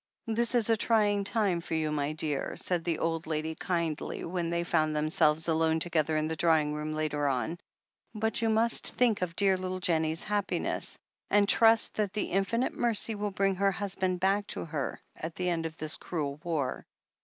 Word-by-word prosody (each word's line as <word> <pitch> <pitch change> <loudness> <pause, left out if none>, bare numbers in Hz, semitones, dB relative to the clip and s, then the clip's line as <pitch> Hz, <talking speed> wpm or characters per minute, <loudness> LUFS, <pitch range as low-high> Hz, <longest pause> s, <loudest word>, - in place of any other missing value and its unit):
"This 235 +2 +1
is 235 -3 +4
a - - +5
trying 205 -2 +2
time 200 -6 +1
for 165 - -4
you, 155 -1 0
my 145 0 -1
dear," 155 -2 -2
said 175 -2 +1
the 165 -2 -1
old 165 0 -2
lady 160 0 -2
kindly, 165 -2 -3
when 170 -1 -2
they 170 0 0
found 155 -3 +1
themselves 155 +1 +2
alone 160 0 +2
together 160 -2 0
in 155 0 0
the 160 - -2
drawing 155 -2 +2
room 150 +1 -3
later 150 -2 -1
on. 135 +5 -1 0.6
"But 220 +1 0
you 225 - +2
must 225 +1 +2
think 230 -5 +2
of 170 -2 -2
dear 195 -1 +3
little 185 0 -4
Jennie's 160 -2 0
happiness 205 -1 -1 0.2
— - - -42
^and 205 -1 +4
trust 225 +1 +4
that 205 -3 0
the 210 - -2
Infinite 195 +6 0
Mercy 230 -1 +1
will 210 0 -2
bring 195 0 +1
her 195 +1 +3
husband 185 -2 -1
back 200 +2 +1
to - - -3
her 150 -4 -4 0.2
at 160 +1 -6
the 180 0 -1
end 165 -2 -1
of 160 0 -12
this 155 0 -1
cruel 145 -5 -4
war." 155 -7 -2
170 Hz, 195 wpm, -29 LUFS, 155-205 Hz, 0.6 s, a